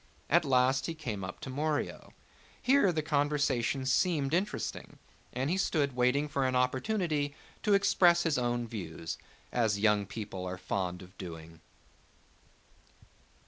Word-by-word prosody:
At -, -, +5 dB
last 130 Hz, 0 st, +3 dB
he 165 Hz, -, -4 dB
came 115 Hz, -11 st, -4 dB
up 95 Hz, -, -6 dB
to 130 Hz, -, -6 dB
Morio. 150 Hz, +2 st, -2 dB, 0.5 s
Here 260 Hz, -7 st, +4 dB
the 155 Hz, -2 st, -1 dB
conversation 145 Hz, -4 st, +1 dB
seemed 145 Hz, 0 st, +1 dB
interesting 190 Hz, +4 st, -2 dB, 0.3 s
and 130 Hz, +2 st, -2 dB
he 185 Hz, -, +1 dB
stood 145 Hz, -8 st, +1 dB
waiting 125 Hz, +4 st, +2 dB
for 140 Hz, -2 st, -1 dB
an 130 Hz, -, 0 dB
opportunity 145 Hz, +3 st, 0 dB, 0.3 s
to 205 Hz, -2 st, +4 dB
express 175 Hz, -3 st, +4 dB
his 155 Hz, -6 st, +1 dB
own 120 Hz, -1 st, -1 dB
views, 85 Hz, -7 st, -6 dB, 0.3 s
as 110 Hz, -4 st, +1 dB
young 105 Hz, -1 st, +2 dB
people 100 Hz, -3 st, -6 dB
are 90 Hz, 0 st, -4 dB
fond 90 Hz, 0 st, -3 dB
of 95 Hz, +1 st, -16 dB
doing. 80 Hz, -2 st, -9 dB
130 Hz, 140 wpm, -31 LUFS, 105-155 Hz, 0.5 s, At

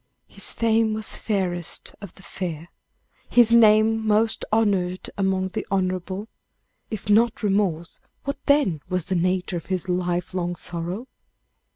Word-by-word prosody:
His 195 Hz, -, -2 dB
fame 225 Hz, -1 st, +2 dB
was 215 Hz, 0 st, -2 dB
fairest 180 Hz, -5 st, -1 dB
of 200 Hz, -4 st, -10 dB
the 195 Hz, -, -16 dB
fair, 170 Hz, -3 st, -5 dB, 0.6 s
his 235 Hz, -1 st, +5 dB
name 220 Hz, -1 st, +5 dB
most 220 Hz, +1 st, +1 dB
honored 195 Hz, -5 st, +1 dB
among 190 Hz, -1 st, 0 dB
the, 215 Hz, +2 st, -4 dB
honorable. 185 Hz, +1 st, -2 dB, 0.6 s
If 215 Hz, -4 st, -6 dB
not 220 Hz, +3 st, +3 dB
remorse, 195 Hz, -5 st, 0 dB, 0.2 s
what 280 Hz, 0 st, -5 dB
then 275 Hz, -, +3 dB
was 185 Hz, -3 st, -1 dB
the 190 Hz, -, -1 dB
nature 180 Hz, +1 st, 0 dB
of 165 Hz, -, -8 dB
his 190 Hz, -1 st, -2 dB
life 180 Hz, 0 st, -1 dB
long 175 Hz, -1 st, -2 dB
sorrow? 175 Hz, +8 st, -4 dB
190 Hz, 140 wpm, -24 LUFS, 180-220 Hz, 0.6 s, his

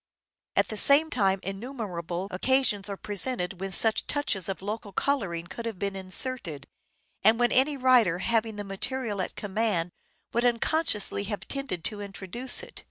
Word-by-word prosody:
At -, -, +2 dB
the 215 Hz, -, -3 dB
same 290 Hz, +7 st, +6 dB
time 195 Hz, -4 st, +2 dB
innumerable 195 Hz, -4 st, -5 dB
occasions 210 Hz, -1 st, +1 dB
are 200 Hz, -, -4 dB
presented 200 Hz, -3 st, -2 dB
when 195 Hz, 0 st, -3 dB
such 220 Hz, +4 st, +5 dB
touches 200 Hz, -, 0 dB
of 190 Hz, 0 st, -4 dB
local 210 Hz, 0 st, -5 dB
colouring 190 Hz, -8 st, -1 dB
could 230 Hz, +6 st, -7 dB
have 225 Hz, -4 st, -5 dB
been 200 Hz, +1 st, -3 dB
inserted, 185 Hz, -, 0 dB, 0.6 s
and 220 Hz, +3 st, +5 dB
when 240 Hz, -1 st, +2 dB
any 275 Hz, +3 st, +3 dB
writer 250 Hz, -9 st, +4 dB
having 225 Hz, +2 st, 0 dB
the 205 Hz, -, -4 dB
material 210 Hz, +1 st, -3 dB
at -, -, -4 dB
command 205 Hz, -4 st, -1 dB, 0.4 s
would 235 Hz, -, +1 dB
unconsciously 235 Hz, -4 st, +1 dB
have 205 Hz, 0 st, -5 dB
tended 275 Hz, -12 st, -4 dB
to 210 Hz, +2 st, -3 dB
introduce 200 Hz, -, 0 dB
it. 485 Hz, -, -10 dB
210 Hz, 160 wpm, -27 LUFS, 190-250 Hz, 0.6 s, same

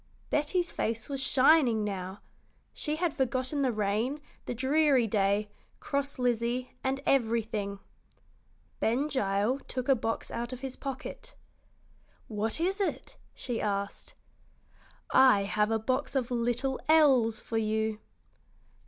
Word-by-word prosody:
Betty's 340 Hz, +4 st, 0 dB
face 225 Hz, +2 st, -2 dB
was 275 Hz, -1 st, -2 dB
shining 265 Hz, -4 st, +4 dB
now. 190 Hz, -1 st, -4 dB, 0.5 s
She 300 Hz, -1 st, -2 dB
had 335 Hz, -1 st, 0 dB
forgotten 260 Hz, +2 st, -1 dB
the 260 Hz, -2 st, +2 dB
rain, 215 Hz, +6 st, -1 dB, 0.3 s
the 245 Hz, -, -3 dB
dreary 270 Hz, 0 st, +3 dB
day, 205 Hz, 0 st, +1 dB, 0.3 s
cross 280 Hz, 0 st, -2 dB
Lizzie, 245 Hz, 0 st, 0 dB
and 270 Hz, +1 st, -1 dB
everything. 225 Hz, -5 st, 0 dB, 1.0 s
Ben 255 Hz, +6 st, +1 dB
Gile 210 Hz, 0 st, 0 dB
took 255 Hz, -1 st, -4 dB
a 275 Hz, -, +6 dB
box 225 Hz, -2 st, -2 dB
out 235 Hz, +1 st, -4 dB
of 255 Hz, 0 st, -7 dB
his 265 Hz, -1 st, -5 dB
pocket. 285 Hz, -, -7 dB, 0.9 s
"What 220 Hz, +4 st, -2 dB
is 380 Hz, +4 st, 0 dB
it?" 395 Hz, -, -3 dB, 0.2 s
she 240 Hz, -3 st, -3 dB
asked. 200 Hz, -1 st, -3 dB, 1.0 s
"I 255 Hz, -7 st, +6 dB
have 210 Hz, +2 st, +1 dB
a 225 Hz, -, +2 dB
box 255 Hz, +4 st, -1 dB
full 270 Hz, -, +2 dB
of 245 Hz, -, -10 dB
little 245 Hz, +2 st, 0 dB
elves 265 Hz, -8 st, +5 dB
for 225 Hz, -, -2 dB
you." 220 Hz, 0 st, -1 dB
245 Hz, 130 wpm, -29 LUFS, 220-275 Hz, 1.0 s, a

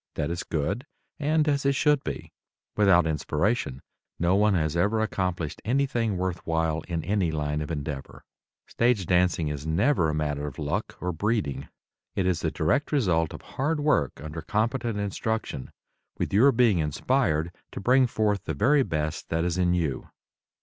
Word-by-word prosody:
That 75 Hz, +2 st, -1 dB
is 85 Hz, 0 st, -2 dB
good 100 Hz, -, -2 dB, 0.3 s
and 155 Hz, +1 st, +2 dB
as 140 Hz, -2 st, +1 dB
it 140 Hz, 0 st, +3 dB
should 150 Hz, -1 st, +3 dB
be. -, -, -5 dB, 0.4 s
Without 95 Hz, -5 st, +5 dB
inspiration 75 Hz, -, -1 dB, 0.3 s
no 85 Hz, +2 st, +2 dB
one 105 Hz, 0 st, +4 dB
has 80 Hz, -2 st, 0 dB
ever 105 Hz, +6 st, +2 dB
accomplished 90 Hz, -7 st, -2 dB
anything 120 Hz, -4 st, 0 dB
worth 90 Hz, -1 st, -2 dB
while 80 Hz, -1 st, 0 dB
in 85 Hz, -3 st, -2 dB
any 100 Hz, -4 st, +1 dB
line 75 Hz, -1 st, -1 dB
of 75 Hz, -, -4 dB
endeavor. 75 Hz, -3 st, -5 dB, 0.4 s
Stage 115 Hz, -5 st, +1 dB
dancing 90 Hz, -3 st, +2 dB
is 75 Hz, +1 st, -5 dB
never 85 Hz, -, +2 dB
a 75 Hz, -, -1 dB
matter 75 Hz, -1 st, -2 dB
of 70 Hz, -, -8 dB
luck -, -, -3 dB
or 90 Hz, -, -1 dB
breeding; 100 Hz, -, -1 dB, 0.5 s
it 95 Hz, -, 0 dB
is 90 Hz, -3 st, +1 dB
the -, -, 0 dB
direct 85 Hz, -, 0 dB
result 90 Hz, -, +2 dB
of -, -, -9 dB
hard 150 Hz, +4 st, -1 dB
work 145 Hz, -, +1 dB
under 75 Hz, +3 st, -6 dB
competent 115 Hz, -, -1 dB
instruction, 105 Hz, -, -3 dB, 0.5 s
with -, -, -2 dB
your 125 Hz, +8 st, +6 dB
being 115 Hz, -7 st, +3 dB
inspired 80 Hz, -, +1 dB, 0.2 s
to -, -, -6 dB
bring 125 Hz, +5 st, +4 dB
forth 105 Hz, -3 st, 0 dB
the 80 Hz, -, -2 dB
very 140 Hz, -, +4 dB
best 80 Hz, -, -2 dB
that 80 Hz, +1 st, 0 dB
is 90 Hz, +1 st, -1 dB
in 90 Hz, -1 st, +3 dB
you. 80 Hz, -7 st, -2 dB
90 Hz, 170 wpm, -26 LUFS, 80-115 Hz, 0.5 s, your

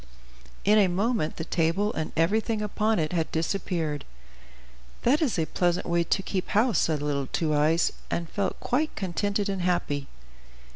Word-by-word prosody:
In 210 Hz, +2 st, +6 dB
a 200 Hz, -, +5 dB
moment, 200 Hz, -1 st, 0 dB
the 160 Hz, -, -4 dB
table 175 Hz, +6 st, +1 dB
and 160 Hz, -, -3 dB
everything 215 Hz, +6 st, +1 dB
upon 215 Hz, +1 st, +1 dB
it 155 Hz, 0 st, -1 dB
had 165 Hz, -2 st, -1 dB
disappeared. 160 Hz, -3 st, -1 dB, 1.0 s
"That 275 Hz, +7 st, +3 dB
is 275 Hz, -, +1 dB
a 160 Hz, -, +1 dB
pleasant 175 Hz, +2 st, 0 dB
way 170 Hz, 0 st, +2 dB
to 195 Hz, -, 0 dB
keep 185 Hz, -1 st, -3 dB
house," 225 Hz, +3 st, +3 dB
said 155 Hz, -3 st, +1 dB
little 140 Hz, -2 st, -1 dB
Two 155 Hz, +1 st, 0 dB
Eyes, 155 Hz, +3 st, +3 dB, 0.2 s
and 170 Hz, -1 st, -2 dB
felt 200 Hz, +3 st, -2 dB
quite 300 Hz, +5 st, 0 dB
contented 200 Hz, +2 st, -1 dB
and 195 Hz, -2 st, -2 dB
happy. 160 Hz, -6 st, 0 dB
180 Hz, 160 wpm, -27 LUFS, 160-210 Hz, 1.0 s, In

